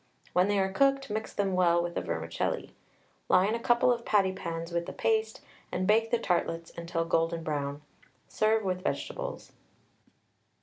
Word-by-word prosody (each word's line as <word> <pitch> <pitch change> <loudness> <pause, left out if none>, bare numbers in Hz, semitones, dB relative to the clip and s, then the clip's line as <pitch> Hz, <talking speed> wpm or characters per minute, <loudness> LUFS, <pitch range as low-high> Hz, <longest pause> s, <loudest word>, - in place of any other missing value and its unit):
When 180 +2 +4
they 205 0 +1
are 190 0 +1
cooked 275 +1 +2
mix 220 +1 -3
them 195 -2 -1
well 175 -2 +3
with 175 0 -4
the - - -2
vermicelli. - - -3 0.6
Line 190 +4 +4
a 235 - -1
couple 240 +1 +3
of 235 -1 -5
patty 200 -4 +3
pans 165 -2 -5
with 170 0 -2
the - - -5
paste, 220 0 0 0.3
and 185 - -1
bake 225 +3 +3
the 240 - +2
tartlets 170 -5 -1
until 170 0 -2
golden 165 0 0
brown. 145 -1 -3 0.4
Serve 220 0 +2
with 185 -1 -1
vegetables. - - -4
190 Hz, 165 wpm, -29 LUFS, 170-220 Hz, 0.6 s, When